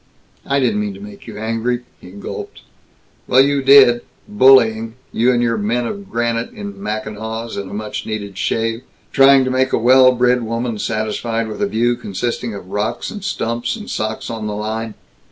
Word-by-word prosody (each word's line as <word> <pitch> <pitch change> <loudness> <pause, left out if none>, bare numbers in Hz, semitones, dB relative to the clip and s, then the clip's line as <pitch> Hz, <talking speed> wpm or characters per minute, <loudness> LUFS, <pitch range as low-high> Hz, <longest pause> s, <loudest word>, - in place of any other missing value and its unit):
"I 140 0 +2
didn't 140 +11 +1
mean 210 -1 -3
to - - -11
make 205 0 -11
you - - -8
angry," 115 +3 -2 0.2
he 90 - -13
gulped. 100 +2 -8 0.6
"Well, 130 - +5
you 140 0 +2
did! 135 -3 +7 0.3
Bullying 115 - +4 0.2
You 120 +3 +2
and 120 -1 +1
your 115 -2 0
men 120 +4 0
of 200 - -6
granite, 115 0 -1
in 205 -2 -8
mackinaws 110 - -4
and 100 -1 -5
a - - -9
much 105 0 -5
needed 100 -2 -5
shave, 115 +4 -1 0.3
trying 135 0 +6
to 130 - -1
make 130 +1 +1
a - - +4
well 130 +2 +6
bred 125 0 +2
woman 115 0 -3
satisfied 115 +1 -2
with 105 - -6
a 205 - +2
view 120 - +1
consisting 120 +1 -4
of 95 -2 -10
rocks 110 +4 -2
and 205 -2 -8
stumps 120 - -2
and 215 -1 -8
socks 110 +2 -3
on 110 -2 -4
the 105 - -3
line! 110 +1 -4
115 Hz, 185 wpm, -18 LUFS, 110-130 Hz, 0.6 s, did